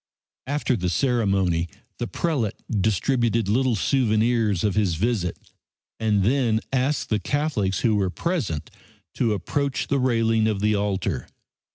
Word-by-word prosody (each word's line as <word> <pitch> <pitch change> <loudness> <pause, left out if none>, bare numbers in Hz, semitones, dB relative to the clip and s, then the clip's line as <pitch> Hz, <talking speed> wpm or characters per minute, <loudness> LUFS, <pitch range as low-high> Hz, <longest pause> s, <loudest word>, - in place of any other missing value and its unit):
After 145 -2 0
the 90 -4 -1
ceremony 95 -7 +1 0.3
the 120 - -2
prelate 140 - -1 0.3
distributed 115 +1 +1
little 125 +3 +2
souvenirs 110 -4 +1
of 105 -2 +1
his 100 -5 +1
visit 100 -2 -1 0.6
and 105 -3 +2
then 115 -1 +2
asked 135 +3 0
the 110 - +1
Catholics 140 -11 -1
who 115 -3 +3
were 95 -2 +1
present 110 - -2 0.4
to 115 -3 +1
approach 140 +8 -2
the 140 - +2
railing 115 -3 +2
of 105 -3 0
the 105 +1 +2
altar. 95 -8 -1
110 Hz, 135 wpm, -24 LUFS, 100-125 Hz, 0.6 s, who